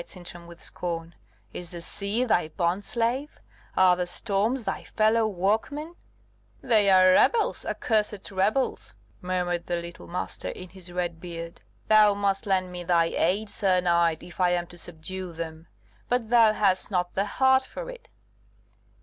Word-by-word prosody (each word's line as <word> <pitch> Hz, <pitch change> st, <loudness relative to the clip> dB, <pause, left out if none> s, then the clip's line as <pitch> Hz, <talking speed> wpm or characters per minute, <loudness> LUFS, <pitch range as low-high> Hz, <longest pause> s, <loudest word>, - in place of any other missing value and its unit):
replied -, -, -15 dB
Sintram, 175 Hz, -2 st, -11 dB
with 170 Hz, 0 st, -13 dB
scorn. 170 Hz, -1 st, -5 dB, 0.4 s
"Is 175 Hz, -1 st, -7 dB
the 175 Hz, -1 st, -7 dB
sea 200 Hz, +7 st, -1 dB
thy 175 Hz, -9 st, +2 dB
bond 170 Hz, +4 st, -1 dB
slave? 245 Hz, +7 st, -1 dB, 0.4 s
Are 185 Hz, -1 st, +6 dB
the 180 Hz, 0 st, -2 dB
storms 220 Hz, +6 st, -1 dB
thy 195 Hz, -, -3 dB
fellow 220 Hz, +1 st, +2 dB
workmen?" 220 Hz, -, -1 dB, 0.7 s
"They 215 Hz, -5 st, +3 dB
are 185 Hz, -1 st, +7 dB
rebels, 450 Hz, -, +3 dB
accursed 210 Hz, -3 st, -1 dB
rebels," 205 Hz, +7 st, 0 dB, 0.3 s
muttered 180 Hz, -1 st, -2 dB
the 175 Hz, -, 0 dB
little 170 Hz, 0 st, -7 dB
Master 180 Hz, +1 st, -4 dB
in 185 Hz, -, -8 dB
his 185 Hz, -1 st, -11 dB
red 175 Hz, -2 st, -3 dB
beard. 170 Hz, -1 st, -7 dB, 0.3 s
"Thou 215 Hz, -1 st, +6 dB
must 200 Hz, 0 st, -1 dB
lend 185 Hz, -2 st, +1 dB
me 180 Hz, 0 st, -6 dB
thy 170 Hz, -1 st, +2 dB
aid, 200 Hz, +6 st, +1 dB
sir 190 Hz, -3 st, +1 dB
knight, 170 Hz, -2 st, +2 dB
if 175 Hz, -, -13 dB
I 180 Hz, -, +4 dB
am 175 Hz, -1 st, 0 dB
to -, -, -12 dB
subdue 175 Hz, +2 st, -5 dB
them; 160 Hz, 0 st, -7 dB, 0.4 s
but 245 Hz, -3 st, 0 dB
thou 230 Hz, -3 st, +6 dB
hast 195 Hz, -3 st, +1 dB
not 180 Hz, -3 st, -1 dB
the 195 Hz, -, 0 dB
heart 265 Hz, 0 st, +5 dB
for -, -, -8 dB
it." -, -, -10 dB
185 Hz, 160 wpm, -26 LUFS, 175-215 Hz, 0.7 s, are